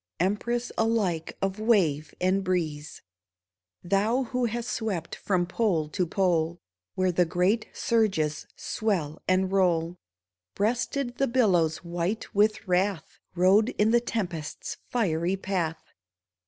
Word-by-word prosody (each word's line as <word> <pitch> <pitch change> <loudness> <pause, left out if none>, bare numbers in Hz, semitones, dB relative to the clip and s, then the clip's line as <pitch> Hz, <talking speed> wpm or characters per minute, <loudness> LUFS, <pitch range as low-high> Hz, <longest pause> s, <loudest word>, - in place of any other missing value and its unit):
Empress 235 +6 0
alike 205 -8 0
of 195 +1 -1
wave 175 -10 +2
and 185 +2 +1
breeze; 160 -5 -2 0.8
Thou 210 +8 +1
who 250 0 -1
hast 235 +1 -3
swept 195 -8 -3
from 185 -3 0
pole 175 -5 0
to 180 +2 -1
pole, 170 -2 +1 0.4
Where 185 -1 +2
the 180 +1 +3
great 180 +6 +1
surges 190 -10 0
swell 180 -9 -2
and 185 0 +2
roll; 175 -3 +1 0.6
Breasted 240 +4 -1
the 275 - +3
billows 185 -11 +2
white 175 +5 -3
with 210 +1 +2
wrath, 185 -2 0 0.2
Rode 195 +6 +4
in 210 +1 +3
the 240 0 +4
tempest's 180 -10 -4
fiery 180 -6 0
path. 180 -4 -2
190 Hz, 120 wpm, -27 LUFS, 170-220 Hz, 0.8 s, Rode